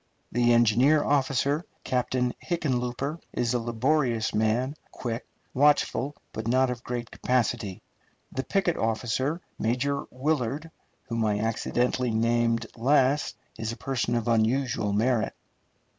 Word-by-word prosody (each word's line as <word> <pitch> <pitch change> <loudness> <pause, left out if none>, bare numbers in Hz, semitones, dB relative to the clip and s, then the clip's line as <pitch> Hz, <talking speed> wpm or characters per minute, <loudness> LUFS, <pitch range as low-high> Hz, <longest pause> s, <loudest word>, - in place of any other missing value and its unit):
The 120 0 +3
engineer 120 +6 +5
officer, 140 +2 +1 0.2
Captain 125 0 0
Hickenlooper, 140 -2 -1
is 120 0 0
a 125 - +2
laborious 120 0 +1
man, 110 +5 +1 0.2
quick, 115 -1 -4 0.3
watchful, 145 0 +2 0.2
but 110 0 -4
not 130 +1 +3
of 120 -1 -6
great 120 -1 -4
capacity. 115 -6 -1 0.5
The 130 - -2
picket 185 0 +1
officer, 125 +8 -1 0.2
Major 130 +5 0
Willard, 145 +2 -1 0.3
whom 115 -3 -2
I 105 -1 +1
accidentally 120 +3 0
name 115 +1 +2 0.2
last, 135 +3 +2 0.2
is 110 0 -2
a 115 - -7
person 125 -3 -1
of 115 -1 -1
unusual 115 -1 +1
merit. 115 +2 +1
125 Hz, 120 wpm, -27 LUFS, 115-135 Hz, 0.5 s, engineer